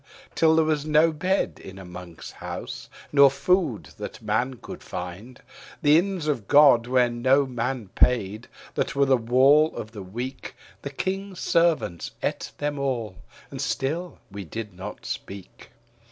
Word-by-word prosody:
Till 160 -1 +4
there 160 -1 +4
was 155 -2 0
not 155 +1 +3
bed 190 +3 0
in 95 0 -10
a 95 - -10
monk's 90 -2 -10
house, - - -7 0.2
nor 140 -1 +7
food 140 - 0
that - - -7
man 115 +5 -1
could - - -10
find. 100 +9 -7 0.4
The 145 0 +6
inns 185 -3 -3
of 135 -10 -2
God 140 -5 +6
where 125 -1 +3
no 130 +4 +2
main 125 -3 -3
paid, 110 0 +1 0.3
that - - -2
were 140 0 +4
the 135 -1 +4
wall 130 +6 +4
of 110 - -6
the 105 -3 -8
weak, 120 +8 -6 0.3
The 140 - -5
King's 190 +5 -4
Servants 165 - +1
ate - - -2
them 145 -1 -2
all. 120 -8 -2 0.3
And - - -5
still 165 +7 -2
we 100 0 -6
did 105 +4 -7
not 95 +4 -8
speak. 100 -2 -8
130 Hz, 155 wpm, -25 LUFS, 105-150 Hz, 0.4 s, nor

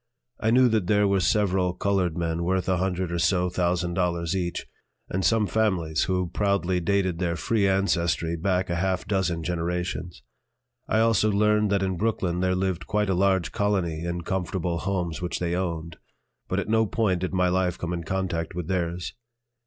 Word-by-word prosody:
I 110 - +1
knew 125 +2 +5
that 110 -5 +1
there 105 0 +3
were 100 0 +2
several 95 -1 +2
colored 95 -3 0
men 85 0 -1
worth 95 +1 0
a 95 -1 +2
hundred 90 -1 -1
or 85 - -1
so 90 0 +2
thousand 90 -1 0
dollars 85 -1 0
each, 90 -2 -2 0.5
and 95 +1 -1
some 105 +5 +3
families 90 -7 +1
who 90 -2 -1
proudly 100 -3 +1
dated 95 -1 0
their 85 -2 0
free 105 +2 +1
ancestry 85 -4 +1
back 90 +1 0
a 85 - 0
half 95 0 -1
dozen 90 -5 0
generations. 90 +1 -3 0.7
I 110 - +3
also 115 -2 +3
learned 105 +1 +3
that 100 -1 +1
in 95 -2 -1
Brooklyn 95 -4 -1
there 95 0 +1
lived 90 -3 -2
quite 105 -2 +1
a - - +2
large 95 -1 +2
colony 90 -6 0
in 85 0 -3
comfortable 90 -1 -2
homes 90 -4 -2
which 90 - -2
they 85 -1 -2
owned; 85 -3 -3 0.5
but - - -1
at - - -3
no 110 0 +2
point 100 -5 +1
did 90 0 -2
my 90 -1 +3
life 90 -1 0
come 85 0 -3
in 85 -1 -3
contact 85 -2 -2
with 90 -3 -4
theirs. 90 -1 -2
90 Hz, 185 wpm, -25 LUFS, 85-100 Hz, 0.7 s, knew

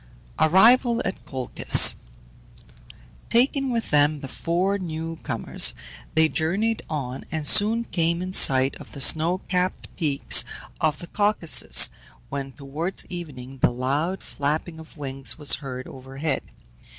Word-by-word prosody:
ARRIVAL 230 - +4
AT 190 - -5
COLCHIS. 130 -2 +3 1.3
Taking 270 +3 +2
with 230 -1 -3
them 145 0 +2
the 135 - -7
four 180 +8 -2
new 165 -2 -6
comers - - +4 0.4
they 160 0 +4
journeyed 195 +9 -2
on, 135 -4 -5
and 160 -2 -4
soon 215 +6 +3
came 170 -5 -1
in 185 +1 -6
sight 135 -5 +5
of - - -14
the 140 - -9
snow 160 +6 +2
capped 180 0 -3
peaks 145 -5 +3 0.4
of 155 -1 0
the - - -10
Caucasus, 205 -3 +3 0.4
when, 140 -1 -6
towards 150 +7 -4
evening, 135 -7 -9
the - - +3
loud 140 +9 -3
flapping 155 +3 -4
of 160 0 -15
wings 135 -2 -3
was 145 -3 +3
heard 130 -2 -8
overhead. 135 +2 -4
160 Hz, 130 wpm, -23 LUFS, 140-185 Hz, 1.3 s, sight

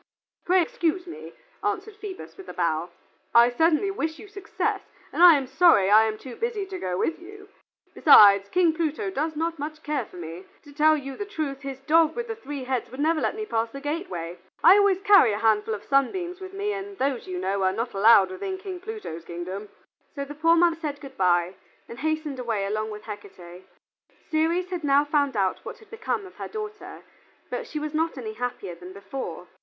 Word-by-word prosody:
"Pray 365 0 +4
excuse 340 +2 -1
me," 345 - -9 0.3
answered 415 +1 -2
Phoebus, 405 -3 -9
with 385 - -12
a - - -7
bow. 170 -1 -1 0.5
"I 235 +1 +7
certainly 325 +8 +2
wish 320 -5 -3
you 425 - -12
success, 400 -1 -3 0.3
and - - -1
I 350 -2 +10
am 275 -2 -1
sorry 255 - +4
I 215 +1 +7
am 215 -1 -2
too 250 +1 -10
busy 455 -4 -2
to 380 -1 -7
go 180 - -3
with 325 - -1
you. 405 +3 -13 0.4
Besides, 200 -8 +7
King 355 -3 +3
Pluto 330 +5 -2
does 315 -2 -2
not 330 +2 -2 0.3
care 300 -1 -1
much - - -6
for - - -16
me. 170 +2 -8 0.2
To 290 - -15
tell 310 +1 +4
you 275 -2 -7
the 410 - -5
truth, 305 -9 -4
his 270 -1 -7
dog 320 +3 +3
with 475 0 -4
the 450 - -4
three 290 -11 -7
heads 255 -1 -2
would 260 - -11
never 310 +1 +1
let - - 0
me 430 0 -4
pass 230 - -1
the 275 - -8
gateway. 275 - -5 0.2
I 380 - +8
always 400 -2 +3
carry 390 - +6
a - - -2
handful 220 0 +1
of 205 - -10
sunbeams 345 +7 0
with 375 0 -8
me, 405 +1 -2
and 395 0 -7
those, 265 -2 -1
you 185 -1 -4
know, 190 +2 -1
are 190 0 +3
not 230 +5 -3
allowed 195 -1 +6
within 380 - -4
King 380 -2 -7
Pluto's 395 - -7
kingdom." 185 +4 -6 0.5
So 280 -1 -4
the 290 - -8
poor 330 +3 +3
mother 340 -1 +3
said 295 -3 -5
good 275 -2 -11
by 175 -1 +2 0.3
and 235 - -10
hastened 310 -2 -2
away 225 -5 -2
along 215 +2 -2
with 210 0 -8
Hecate. 190 -4 -11 0.6
Ceres 335 +3 +1
had 350 -3 -4
now 285 0 +4
found 285 -4 0
out 190 -2 0
what - - -8
had 440 -4 -20
become 450 -2 -3
of 370 - -14
her - - -5
daughter, 425 -1 -8 0.5
but - - -4
she 305 - -6
was 300 0 -4
not 320 -1 -1
any 220 -4 -5
happier 220 -6 -5
than 180 +2 -11
before. 195 -3 -7
290 Hz, 210 wpm, -25 LUFS, -, 0.6 s, I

